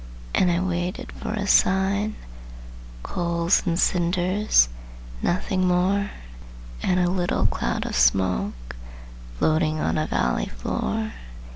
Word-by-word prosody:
And 180 - +3
I 170 - +1
waited 180 -1 -3
for - - -6
a 210 -3 -2
sign; 200 +2 +2 0.9
Coals 170 0 +1
and 170 0 0
cinders, 180 - +3 0.5
nothing 185 +1 0
more; 190 +3 +1 0.7
And 185 0 +1
a 175 - +2
little 180 -1 0
cloud - - -1
of - - -4
smoke 60 -1 +1 0.6
Floating 155 - +1
on 155 - 0
a 155 - -1
valley - - 0
floor. 220 - -3
180 Hz, 115 wpm, -24 LUFS, 155-190 Hz, 0.9 s, And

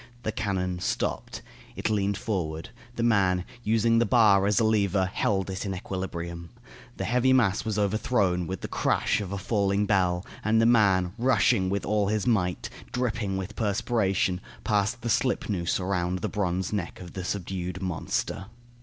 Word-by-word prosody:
The 110 - -1
cannon 95 -4 -2
stopped. - - -3 0.3
It - - -2
leaned 100 -1 0
forward. 85 -4 -3 0.3
The 115 - -1
man, 95 -6 +2 0.2
using 115 +1 +3
the 120 - +3
bar 100 -4 +5
as 105 -2 +3
a - - +3
lever, 100 -3 +2
held 95 0 -1
it 95 - -4
in 95 -2 -3
equilibrium. 85 -2 -5 0.5
The - - -3
heavy 125 +2 +3
mass 105 -7 +3
was 110 -2 -2
overthrown, 100 -4 +1
with 95 -1 -5
the - - -4
crash - - +1
of 95 -2 -5
a 100 - -2
falling 100 -1 +1
bell, 90 -3 +1 0.2
and 110 +1 +3
the 115 - +4
man, 95 -6 +4
rushing 115 -5 +3
with 100 +1 -1
all 105 -1 +1
his 105 0 0
might, 90 -7 +1 0.2
dripping 115 -6 -1
with 95 +2 -5
perspiration, 100 -4 0 0.2
passed 105 +3 0
the - - -2
slipnoose 100 -8 0
around 90 -1 -1
the - - 0
bronze 95 -2 -1
neck 95 -5 -3
of 90 -2 -10
the 95 - -5
subdued 90 -1 -4
monster. 95 +1 -3
100 Hz, 165 wpm, -27 LUFS, 90-110 Hz, 0.5 s, bar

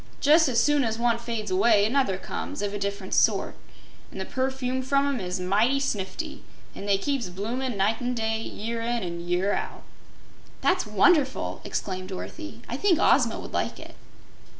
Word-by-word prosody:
Jus' 310 +1 +5
as 235 -2 +2
soon 290 +3 +3
as 225 -1 -1
one 235 0 +1
fades 230 -4 -4
away, 205 +2 +4
another 225 -5 +1
comes, 195 - -5
of 205 0 -2
a 205 - -3
different 200 0 -3
sort, - - +3 0.6
an' - - -10
the - - -3
perfume 260 -1 -1
from 275 +2 +2
'em 280 -3 0
is 180 -1 -3
mighty 210 +9 +2
snifty, 275 - -3 0.3
an' 200 - -7
they 200 -1 +4
keeps 255 -2 -2
bloomin' 230 +6 -3
night 210 +5 +1
and 245 0 -1
day, 220 0 -1
year 230 +1 -4
in 235 0 -1
an' 170 -1 -4
year 180 +3 0
out." - - -4 0.8
"That's 365 - +2
wonderful!" 265 - +2
exclaimed 185 -1 -4
Dorothy. 310 - -7
"I - - -3
think 385 -5 +3
Ozma - - +3
would - - -9
like - - -1
it." - - -11
230 Hz, 175 wpm, -26 LUFS, 200-265 Hz, 0.8 s, Jus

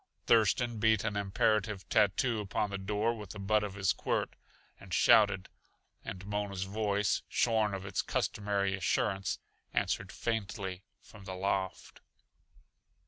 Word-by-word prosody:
Thurston 115 +1 +3
beat 110 -1 +3
an 105 - -2
imperative 100 0 0
tattoo 110 +4 +2
upon 105 0 -2
the 100 - -3
door 105 +4 0
with 105 -4 -9
the 100 - -8
butt 105 +2 +2
of 100 -2 -5
his 95 -2 +2
quirt, - - -2 0.4
and 95 - -13
shouted. 105 -1 +5 0.6
And 95 -1 -7
Mona's 100 -2 -2
voice, 100 +1 0
shorn 110 -4 +2
of 95 0 -6
its 100 -1 -1
customary 100 -2 -1
assurance, 95 +1 0 0.4
answered - - 0
faintly 100 -4 -3 0.2
from 100 -4 -14
the 95 -1 -5
loft. 95 0 -2
100 Hz, 135 wpm, -32 LUFS, 95-110 Hz, 0.6 s, shouted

